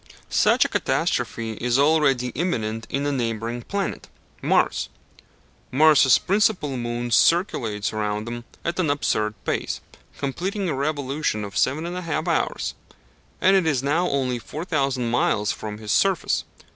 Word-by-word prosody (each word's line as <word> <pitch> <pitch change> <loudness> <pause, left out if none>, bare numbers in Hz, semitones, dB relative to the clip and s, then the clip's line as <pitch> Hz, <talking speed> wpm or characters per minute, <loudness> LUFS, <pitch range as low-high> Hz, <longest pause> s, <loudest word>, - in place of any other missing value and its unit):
Such - - +4
a - - +2
catastrophe 115 -1 -1
is 125 +1 +2
already 140 -4 +3
imminent 115 -8 -2
in 140 +1 -1
a 145 - +1
neighbouring 115 -2 -2
planet 200 +9 -3 0.3
Mars. - - +1 0.8
Mars' 145 -2 +6
principal 195 -8 +1
moon 120 0 -3
circulates 115 - +2
round 105 0 -2
him 120 0 -5 0.2
at 170 +2 -2
an 165 -5 +1
absurd 110 -7 0
pace, - - -2 0.4
completing 185 +8 -2
a 165 - 0
revolution 140 -5 -1
in 100 - -8
7 140 +9 +1
1/2 170 -2 -3
hours, 165 - 0 0.7
and 190 +1 +5
it 185 -4 +3
is 135 -5 +1
now 165 +6 +1
only 130 -3 0
4,000 135 - -2
miles 105 -3 +1
from 105 -1 -6
his 105 -1 -5
surface. 195 -3 +2
135 Hz, 135 wpm, -23 LUFS, 115-160 Hz, 0.8 s, Mars